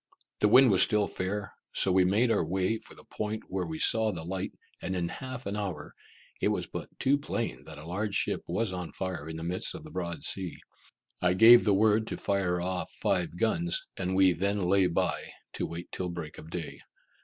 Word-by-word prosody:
The 105 - +4
wind 125 +2 +7
was 95 - +5
still 105 -2 +4
fair, 100 +2 -3 0.2
so 95 - +2
we 95 0 +5
made 110 +6 +3
our 105 - +2
way 95 +6 0
for - - -15
the - - -15
point 110 0 -4
where 90 -2 -2
we 80 -1 -4
saw 110 +5 +3
the 85 -4 -6
light, 95 +3 -3 0.3
and 95 - -3
in 85 -1 -1
half 130 +4 -7
an 100 - -3
hour, 95 -8 -4 0.5
it - - +3
was - - 0
but - - -7
too 140 +2 +3
plain 115 - -3
that 80 -2 -10
a 75 - -10
large 100 +4 -2
ship - - 0
was 110 -4 -1
on 90 -2 -5
fire 90 -5 -4
in 80 - -5
the 80 - -6
midst 90 - -2
of 160 - -8
the 155 - -11
broad 85 - -4
sea. 95 -4 -2 0.6
I 90 0 +3
gave 115 +4 +9
the 100 -2 +4
word 110 +2 +3
to - - -4
fire 95 -3 0
off 90 +1 -2
five 90 -3 0
guns, 85 -5 +1
and 95 0 -2
we 95 -1 +5
then 100 +4 0
lay 95 0 +4
by, 85 - -1 0.2
to - - -2
wait 85 +1 -7
till 90 -1 -3
break 85 -3 -7
of 80 - -11
day. 85 -2 -5
95 Hz, 215 wpm, -29 LUFS, 85-105 Hz, 0.6 s, gave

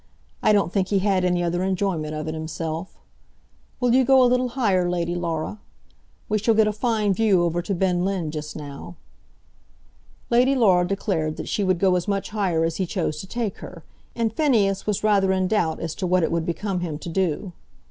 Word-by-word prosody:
I - - +4
don't 200 -4 +2
think 190 -2 +1
he 200 - +1
had 190 -1 +1
any 180 -1 +1
other 175 +1 -1
enjoyment 185 -5 -1
of 155 0 -4
it 155 - -3
himself. 160 +2 -5 0.8
Will 245 -2 +2
you 260 +1 +5
go 265 +1 +5
a - - +6
little 250 +1 +2
higher, 205 -8 +1
Lady 175 -1 -1
Laura? 170 +3 -3 0.7
We 215 0 0
shall 225 +2 +2
get 220 0 +5
a 210 - +1
fine 215 -2 0
view 195 -4 +3
over 170 0 0
to 195 +3 -3
Ben 180 -1 +1
Linn 185 -5 -2
just 150 -1 -6
now." 145 +3 -8 1.4
Lady 250 +3 +4
Laura 185 -8 +4
declared 170 -6 -2
that - - -6
she 205 - -1
would 185 -2 +2
go 185 +1 +3
as 180 +1 -1
much 200 0 -2
higher 190 -6 0
as 165 0 -2
he 190 - -1
chose 165 -4 -2
to 190 - -10
take 230 -2 -3
her, 170 -3 -10 0.3
and 230 -2 -1
Phineas 215 -10 +1
was 210 -1 -1
rather 200 -3 +3
in 185 -1 +1
doubt 175 -6 0
as 165 -2 -4
to 185 - -3
what 180 0 +2
it - - 0
would 170 -1 -1
become 190 +2 -2
him 165 -4 -4
to 165 - -10
do. 180 +1 -1
185 Hz, 210 wpm, -23 LUFS, 170-210 Hz, 1.4 s, a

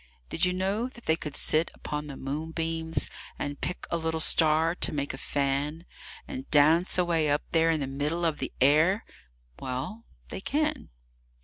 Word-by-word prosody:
Did - - +2
you 180 - +2
know 195 +6 0
that 240 -2 -14
they 160 - +3
could 150 -3 -6
sit 155 +2 +1
upon 150 0 -5
the 140 - -7
moonbeams 160 +2 -2 0.3
And 145 0 -4
pick 180 - -3
a 170 - +1
little 160 0 -2
star 160 0 +5
to - - +1
make 140 -1 -2
a - - -6
fan, 145 +4 -1 0.4
And 265 -1 -7
dance 160 +6 +4
away 170 -4 +2
up 145 +1 +1
there 165 0 +3
in 160 -2 +1
the - - 0
middle 145 +6 -2
of 160 -2 0
the - - -3
air? 155 - +4 0.5
Well, 135 - -5 0.2
they - - -6
can. 305 +7 -1
160 Hz, 175 wpm, -28 LUFS, 145-175 Hz, 0.5 s, star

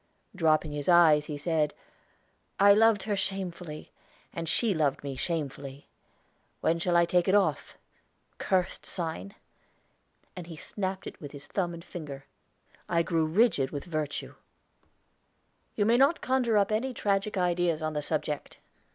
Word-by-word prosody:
Dropping 155 -3 +2
his 145 +2 -3
eyes, 160 -4 +6
he 150 -1 -5
said: 150 0 0 0.8
"I 200 +1 +8
loved 220 -1 +4
her 205 0 -1
shamefully, 180 -5 -4 0.4
and 165 -1 -4
she 210 +6 +2
loved 150 -5 0
me 140 -1 -4
shamefully. 140 -2 -4 0.7
When 165 +1 +1
shall 175 0 +2
I 170 - +5
take 175 0 +1
it 190 - +4
off 205 - 0 0.6
cursed 185 -2 0
sign?" 160 - -4 1.0
And 180 -2 -8
he 165 - -8
snapped 190 +4 -4
it - - -9
with 145 -1 -8
his 145 0 -10
thumb 180 -3 -2
and 170 +1 -11
finger. 140 -5 -8 0.6
I 170 -1 +2
grew 165 -2 +1
rigid 165 - +2
with 145 -2 -6
virtue. 155 -4 -4 1.4
"You 205 - +1
may 230 +2 +4
not 275 +6 +4
conjure 250 -4 +1
up 200 0 +2
any 245 +4 -1
tragic 200 0 0
ideas 175 -3 +1
on 155 0 -2
the 150 - -2
subject. 150 -1 -3
170 Hz, 150 wpm, -28 LUFS, 150-195 Hz, 1.4 s, I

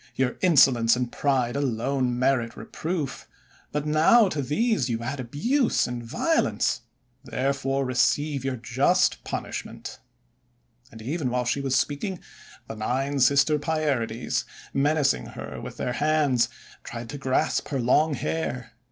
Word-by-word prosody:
Your 130 -1 0
insolence 130 -9 +5
and 125 -1 -2
pride 130 -4 0
alone 130 -1 0
merit 125 -3 +1
reproof. 160 -5 -4 0.4
But 150 0 -2
now 160 +9 +5
to 155 -5 -2
these 150 - 0
you 115 0 -2
add 130 +4 -4
abuse 225 - +1
and 120 -1 -4
violence. 115 - 0 0.4
Therefore 135 +2 -1
receive 140 +2 +1
your 135 -1 -1
just 135 +9 +1
pun - - -3
ishment." - - -7 0.9
And 110 -1 -11
even 145 +2 -2
while 125 0 -1
she 130 +3 0
was 135 -1 0
speaking, 150 +8 -1 0.5
the 110 - -6
Nine 135 +6 -1
Sister 140 +4 +4
Pierides, 140 -7 -1 0.3
menacing 140 - +2
her - - -7
with - - -8
their 125 - -2
hands, 145 -5 +2 0.3
tried 120 0 -7
to 145 - -6
grasp 130 -1 0
her 140 -2 -2
long 145 +5 +3
hair. 125 -8 -3
135 Hz, 135 wpm, -25 LUFS, 125-150 Hz, 0.9 s, insolence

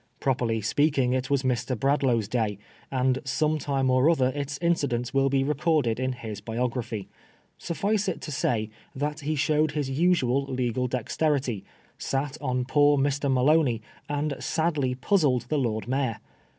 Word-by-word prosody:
Properly 120 -4 0
speaking, 135 +3 +2
it 130 +1 -1
was 140 -1 +1
Mr. 125 -1 -1
Bradlaugh's 135 -6 +2
day, 110 -3 -1 0.3
and 130 0 +1
some 155 +4 0
time 135 -2 0
or 130 +4 +4
other 130 -6 +3
its 145 0 -4
incidents 140 -8 0
will 135 0 +3
be 135 0 +2
recorded 150 -5 +1
in 130 0 0
his 110 -4 -7
biography. 115 -2 -3 0.5
Suffice 200 +4 -1
it 185 - -2
to 150 - -6
say 115 -6 -1 0.2
that 150 +3 -2
he 155 +1 -2
showed 150 +1 +1
his 145 -3 -2
usual 140 -4 +2
legal 125 -1 -1
dexterity, 130 -1 -1 0.4
sat 135 +1 -2
on 125 -2 -1
poor 145 +2 +4
Mr. 140 0 +1
Maloney, 130 -3 +3 0.3
and 145 0 -1
sadly 150 -6 0
puzzled 130 - +2
the 150 - +1
Lord 110 -4 -1
Mayor. 130 -3 0
135 Hz, 150 wpm, -26 LUFS, 125-145 Hz, 0.5 s, or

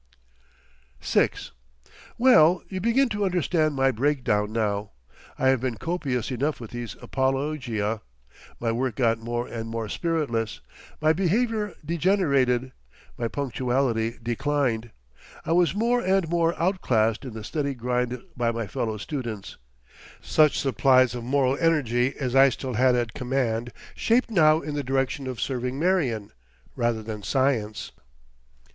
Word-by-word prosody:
'" - - -34
VI - - +2 0.9
Well, 180 -9 +5
you 185 -1 -5
begin 235 +6 +3
to 210 -2 -2
understand 170 -4 +1
my 135 0 +3
breakdown 120 -5 0
now, 105 -2 -1 0.4
I 130 - +3
have 130 -3 +2
been 125 -3 -2
copious 135 -6 -2
enough 140 +5 -1
with 115 -3 -9
these 120 -1 -6
apologia. 130 -6 -1 0.6
My 115 -1 0
work 125 0 -1
got 115 -3 +2
more 120 +1 -3
and 115 -1 -6
more 115 -1 -3
spiritless, 140 -10 -1 0.4
my 155 +1 +4
behaviour 210 +3 0
degenerated, 140 -8 +1 0.4
my 120 - -2
punctuality 125 -3 -1
declined; 120 -1 -1 0.6
I - - -2
was 170 -1 +3
more 240 +3 +2
and 190 -2 +2
more 170 0 +1
outclassed 120 - +1
in 130 -4 -7
the 110 - -6
steady 140 +3 -2
grind 125 0 -2
by 120 -1 0
my 115 -1 -3
fellow 110 +2 -3
students. 115 -5 -5 0.6
Such 155 -2 +3
supplies 130 -1 +3
of 120 -1 -5
moral 130 +1 +2
energy 135 -6 +2
as 130 -2 -2
I 135 0 +7
still 130 0 -5
had 125 +2 +3
at 120 -2 -1
command 125 -3 -1 0.2
shaped 235 +1 +1
now 155 -5 +5
in 150 - -5
the 145 -1 -2
direction 135 +1 -1
of 130 -2 -5
serving 125 0 -2
Marion 140 - 0 0.4
rather 115 -2 0
than 105 -1 -6
science. 120 -4 0
130 Hz, 140 wpm, -25 LUFS, 115-155 Hz, 0.9 s, I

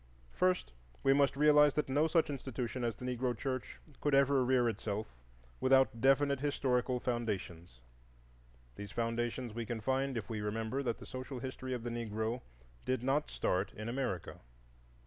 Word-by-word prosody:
First, 185 - +1 0.3
we 135 - +5
must 140 -1 +3
realize 150 -1 +6
that 150 - +1
no 145 +4 +2
such 160 -2 +2
institution 130 -3 -4
as 115 -2 0
the 125 - -8
Negro 125 -1 -1
church 130 0 -3 0.2
could 145 -2 +2
rear 130 -3 +4
itself 105 - -3 0.5
without 130 -3 +4
definite 140 +1 +4
historical 130 -3 0
foundations. 95 - -3 1.0
These 100 0 -7
foundations 120 0 -2
we 115 +1 -3
can 120 -2 -3
find 130 +3 0
if 115 - -4
we 110 -3 -3
remember 110 +5 -2
that 120 -4 -1
the - - -11
social 130 +1 -6
history 130 0 -5
of 120 - -6
the 120 - -3
Negro 115 +1 -2 0.4
did 130 -1 -1
not 140 +3 +1
start 95 +2 -1
in 110 +1 -6
America. 120 -8 -3
125 Hz, 155 wpm, -34 LUFS, 115-135 Hz, 1.0 s, realize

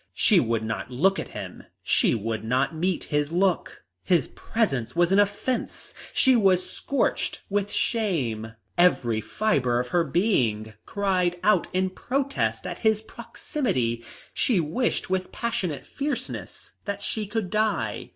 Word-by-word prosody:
She 205 -5 +5
would 115 -5 0
not 110 +2 -3
look 190 +10 +2
at - - -4
him; - - -8 0.2
she - - +3
would 110 0 -3
not 130 +6 +1
meet 175 +3 -1
his 150 +1 +1
look. 180 +1 0 0.2
His 170 -7 +2
presence 150 - -1
was 175 +1 +3
an 195 - +5
offence, 205 +5 -1 0.2
she 260 -2 +4
was 190 -5 +3
scorched 280 - -1
with 205 0 0
shame. 130 - -1 0.3
Every 120 -11 +3
fibre 125 - +1
of 125 0 -3
her 175 +3 +3
being 120 - +1
cried 185 -3 +1
out 205 -3 +3
in 185 0 0
protest 275 +7 -1
at - - -5
his 220 -1 +2
proximity. 125 - -2 0.3
She 230 -8 +2
wished 180 +6 -1
with 185 -1 -1
passionate 185 - -2
fierceness 275 -3 -5
that 200 0 -4
she 215 -2 -1
could 210 -3 -3
die. 215 0 0
185 Hz, 140 wpm, -26 LUFS, 125-215 Hz, 0.3 s, She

